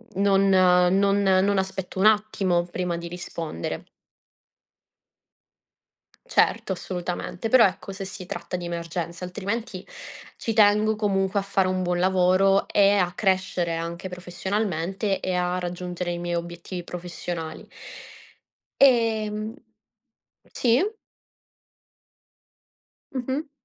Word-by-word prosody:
non 195 Hz, 0 st, +3 dB
non 185 Hz, +2 st, +4 dB
non 195 Hz, +1 st, +3 dB
aspetto 190 Hz, 0 st, -3 dB
un 200 Hz, -, +3 dB
attimo 200 Hz, -5 st, +2 dB
prima 180 Hz, -2 st, -2 dB
di 170 Hz, 0 st, -6 dB
rispondere. 170 Hz, -, -5 dB, 2.4 s
Certo, 190 Hz, -, +2 dB
assolutamente. 180 Hz, +3 st, -4 dB
Però, 245 Hz, -3 st, +7 dB
ecco, 195 Hz, +1 st, -2 dB
se 195 Hz, 0 st, -6 dB
si 190 Hz, 0 st, -8 dB
tratta 180 Hz, -, -5 dB
di 175 Hz, -1 st, -4 dB
emergenze; 170 Hz, +1 st, -4 dB
altrimenti 200 Hz, +1 st, -4 dB, 0.5 s
ci 225 Hz, -, -2 dB
tengo, 215 Hz, 0 st, +4 dB
comunque, 200 Hz, -1 st, +1 dB
a -, -, -3 dB
fare 195 Hz, -1 st, +1 dB
un 185 Hz, 0 st, 0 dB
buon 175 Hz, 0 st, 0 dB
lavoro 190 Hz, +1 st, +3 dB
e 200 Hz, 0 st, +5 dB
a 180 Hz, -3 st, +2 dB
crescere 185 Hz, -3 st, 0 dB
anche 170 Hz, +3 st, -4 dB
professionalmente 190 Hz, +1 st, -2 dB
e 185 Hz, -, -2 dB
a 180 Hz, 0 st, 0 dB
raggiungere 180 Hz, 0 st, -4 dB
i 175 Hz, -, -4 dB
miei 175 Hz, 0 st, -2 dB
obiettivi 175 Hz, +1 st, -5 dB
professionali. 170 Hz, -2 st, -6 dB, 1.2 s
Ehm 220 Hz, -4 st, +3 dB, 1.0 s
sì? 245 Hz, +7 st, +3 dB, 2.3 s
Mh-mh. 270 Hz, +4 st, -3 dB
185 Hz, 105 wpm, -25 LUFS, 175-200 Hz, 2.4 s, Però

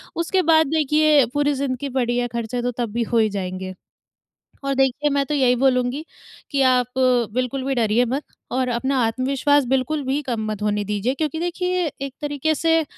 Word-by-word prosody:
उसके 340 Hz, +3 st, +1 dB
बाद 315 Hz, -1 st, +5 dB
देखिए, 300 Hz, -2 st, +4 dB
पूरी 290 Hz, 0 st, +1 dB
ज़िंदगी 275 Hz, 0 st, -3 dB
पड़ी 240 Hz, 0 st, 0 dB
है, 245 Hz, -, 0 dB
खर्चे 235 Hz, +1 st, -3 dB
तो 245 Hz, -, -1 dB
तब 235 Hz, -3 st, -1 dB
भी 235 Hz, 0 st, 0 dB
हो -, -, +4 dB
ही 220 Hz, -1 st, +3 dB
जाएँगे। 185 Hz, -1 st, -5 dB, 0.9 s
और 275 Hz, 0 st, 0 dB
देखिए, 270 Hz, +2 st, +1 dB
मैं 280 Hz, 0 st, +1 dB
तो 300 Hz, -, -2 dB
यही 255 Hz, -3 st, +3 dB
बोलूँगी 255 Hz, +2 st, +1 dB, 0.5 s
कि 275 Hz, -1 st, +1 dB
आप 250 Hz, -1 st, +3 dB, 0.5 s
बिल्कुल 255 Hz, +1 st, -1 dB
भी 270 Hz, 0 st, 0 dB
डरिए 230 Hz, 0 st, +2 dB
मत 265 Hz, +5 st, -2 dB, 0.3 s
और 255 Hz, 0 st, 0 dB
अपना 265 Hz, +2 st, 0 dB
आत्मविश्वास 270 Hz, +4 st, +1 dB
बिल्कुल 265 Hz, +3 st, 0 dB
भी 270 Hz, +3 st, 0 dB
कम 235 Hz, -5 st, -3 dB
मत 210 Hz, -1 st, -5 dB
होने 210 Hz, 0 st, 0 dB
दीजिए 210 Hz, +5 st, -1 dB
क्योंकि 315 Hz, +2 st, -2 dB
देखिए, 360 Hz, 0 st, -1 dB
एक 275 Hz, -1 st, -5 dB
तरीके 295 Hz, +1 st, 0 dB
से 325 Hz, +1 st, +2 dB
265 Hz, 185 wpm, -22 LUFS, 240-290 Hz, 0.9 s, बाद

